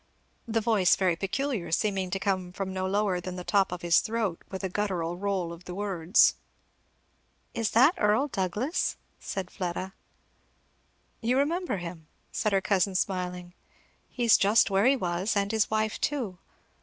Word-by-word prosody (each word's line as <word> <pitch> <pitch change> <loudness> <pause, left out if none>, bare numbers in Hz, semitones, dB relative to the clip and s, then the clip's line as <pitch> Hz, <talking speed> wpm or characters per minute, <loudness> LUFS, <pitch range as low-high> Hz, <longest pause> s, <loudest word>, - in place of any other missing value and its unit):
the 225 0 0
voice 210 -5 +4
very 185 -3 +1
peculiar, 195 - -2
seeming 190 +1 0
to 195 - -1
come 190 -2 -1
from 190 +1 -4
no 185 0 -2
lower 195 -2 0
than 180 +1 -6
the 180 - -6
top 195 0 +2
of 180 -1 -6
his 170 -1 +5
throat, 220 -6 -2
with 190 0 -6
a - - +1
guttural 180 -4 -2
roll 185 -3 -2
of 170 +1 -13
the 180 - -7
words. 190 -2 +3 1.2
"Is 225 -2 -1
that 260 +9 +6
Earl 215 +7 +3
Douglass?" 215 - -1 0.2
said 190 -2 -5
Fleda. 185 +1 -4 1.3
"You 245 +3 +1
remember 325 - 0
him?" 170 -3 -8 0.2
said 215 - 0
her 195 -1 +2
cousin 195 -1 +1
smiling. 180 -2 -2 0.6
"He's 235 -3 +4
just 200 +1 +4
where 195 +4 +3
he 275 - +5
was, 185 -1 -1
and 200 0 0
his 220 -1 +1
wife 215 0 -1
too. 235 -12 -2
195 Hz, 160 wpm, -28 LUFS, 180-220 Hz, 1.3 s, that